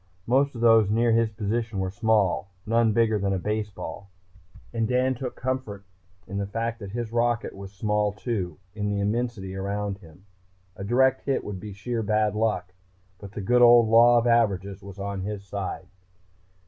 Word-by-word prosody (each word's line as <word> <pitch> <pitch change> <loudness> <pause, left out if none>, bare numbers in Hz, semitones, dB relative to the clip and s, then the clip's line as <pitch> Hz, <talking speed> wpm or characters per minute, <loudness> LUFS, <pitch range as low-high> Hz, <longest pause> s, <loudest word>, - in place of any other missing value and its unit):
Most 135 +3 +2
of 115 - -6
those 115 -3 +5
near 115 +2 +2
his 115 0 +3
position 110 +1 -3
were 95 -1 -1
small, 105 -3 +1 0.2
none 115 0 +3
bigger 110 -1 +2
than 100 0 0
a - - 0
baseball, 105 0 -4 0.6
and 115 -1 0
Dan 130 +2 +2
took 125 0 -5
comfort 125 -6 -4 0.4
in 100 +1 -4
the 100 - -2
fact 115 +3 -3
that 100 -3 -7
his 115 +1 -4
rocket 120 0 0
was 95 0 -9
small 105 +1 0
too, 100 -6 -4 0.2
in 105 -1 -2
the 100 0 -1
immensity 105 -2 -2
around 100 +1 -3
him. 90 0 -17 0.5
A 95 - -7
direct 130 +5 +3
hit 135 - 0
would 100 -2 -6
be 105 +2 -8
sheer 115 +4 -3
bad 105 -1 +1
luck, 105 -5 -1 0.5
but 100 -1 -10
the 105 - -5
good 125 +5 +3
old 120 -2 +7
law 120 +2 +7
of 120 - +2
averages 100 -5 +1
was 100 0 -11
on 100 -1 -4
his 100 +1 -5
side. 95 -1 -5
105 Hz, 180 wpm, -26 LUFS, 100-115 Hz, 0.6 s, old